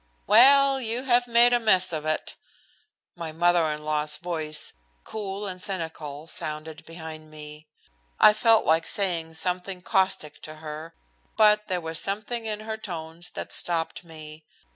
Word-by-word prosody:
"Well, 270 +5 +6
you 235 +2 -2
have 245 -2 +3
made 240 +1 +5
a 240 - +4
mess 185 -6 +3
of 155 -1 -3
it!" 155 - -2 0.8
My 165 -2 -6
mother 170 0 +2
in 150 0 -6
law's 150 0 +1
voice, 155 -3 -3 0.3
cool 205 -1 -5
and 185 -2 -6
cynical, 160 -6 -4
sounded 155 -1 -4
behind 160 -1 -9
me. 150 0 -10 0.5
I 210 - +8
felt 225 +1 +4
like 160 +1 +2
saying 170 -5 0
something 180 +2 -3
caustic 185 -6 0
to 155 - -8
her, 155 +1 -8 0.4
but 210 -1 +5
there 180 -2 -1
was 160 0 -4
something 215 +3 -3
in 215 -1 -3
her 220 0 -5
tones 170 -4 -6
that - - -6
stopped 165 -1 -2
me. 155 -2 -10
175 Hz, 150 wpm, -26 LUFS, 155-210 Hz, 0.8 s, I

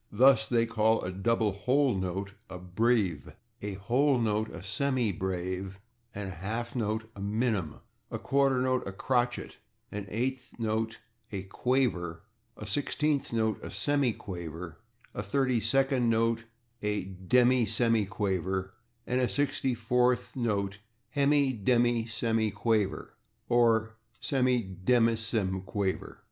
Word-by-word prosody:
Thus 130 -4 +5
they 115 -2 +3
call 110 -1 +2
a 90 - -3
double 110 +3 +1
whole 125 +7 +2
note 95 +1 -3 0.2
a 90 - -6
/breve/, 90 - 0 0.3
a 100 -1 -4
whole 130 +8 +2
note 110 -2 0
a 90 - -8
/semibreve/, 95 -5 -1 0.4
a 100 -1 -4
half 110 +7 -4
note 110 -1 -2
a 100 - -8
/minim/, 105 -5 -1 0.3
a - - -3
quarter 135 -1 +2
note 130 0 +2
a - - -3
/crotchet/, 120 +3 -1 0.3
an 100 -1 -5
eighth 125 +4 -3
note 110 0 -1 0.3
a 95 -2 -4
/quaver/, 95 -6 0 0.4
a 105 - -7
sixteenth 145 +6 0
note 110 -2 0
a - - -5
/semi 140 -5 0
quaver/, 85 -3 -7 0.3
a - - -3
thirty 125 +4 +1
second 130 +2 +2
note 115 0 +1 0.4
a 105 -2 -1 0.2
/demisemiquaver/, 105 -6 +2 0.3
and 125 +1 +1
a 125 - +2
sixty 135 -3 0
fourth 125 +2 +1
note 100 -5 -1 0.4
a 140 -1 +3
/hemidemisemiquaver/, 115 -5 +1 0.4
or 110 -2 +3 0.2
/semidemisemiquaver 110 -4 0
110 Hz, 115 wpm, -29 LUFS, 100-125 Hz, 0.4 s, Thus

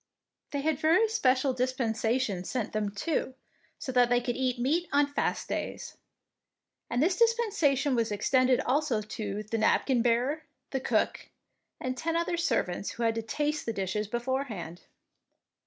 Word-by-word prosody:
They 285 - -2
had 315 0 -1
a 345 +9 +5
special 265 - +2
dispensation 240 -5 0
sent 230 +3 -3
them, 215 -1 0
too, 260 +5 -2 0.4
so 260 - -5
that 245 -1 +4
they 245 0 +4
could 245 -1 -2
eat 255 -1 0
meat 310 +8 0
on 285 +1 +4
fast 285 0 -2
days; - - -4 0.9
and 245 +4 +1
this 360 +3 +2
dispensation 415 - +2
was 230 -3 +1
extended 255 +5 +3
also 255 -6 +1
to 210 -1 -4
the 220 +2 -3
napkin 240 +3 +3
bearer, 245 +6 +1 0.3
the 265 - 0
cook, - - 0 0.5
and 255 0 -3
ten 325 +4 -2
other 340 +1 0
servants 230 - 0
who 235 - -4
had 225 -1 +3
to 225 - -2
taste 295 +6 -2
the 230 - 0
dishes 200 +1 -2
beforehand. 240 -7 -3
255 Hz, 155 wpm, -29 LUFS, 225-290 Hz, 0.9 s, a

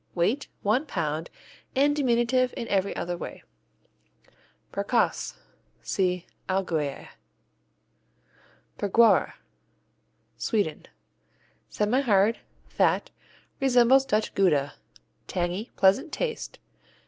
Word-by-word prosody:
Weight 210 +11 0 0.2
one 220 +7 +2
pound 160 - -2 0.5
and 285 +2 +3
diminutive 255 -2 +2
in 230 - -4
every 195 0 0
other 175 0 -3
way. - - -8 1.3
Bergkäse 200 +4 0 0.5
see 180 -2 -1 0.2
Allgäuer. 160 -7 -2 1.7
Bergquara 225 +3 +4 1.0
Sweden 205 -9 -1 0.8
Semihard, 215 -1 +2 0.3
fat, - - +1 0.5
resembles 265 0 +5
Dutch 215 -5 -1
Gouda. 150 -8 +2 0.5
Tangy, 180 +5 -2
pleasant 195 +9 +3
taste. 465 -2 -4
205 Hz, 75 wpm, -26 LUFS, 180-250 Hz, 1.7 s, resembles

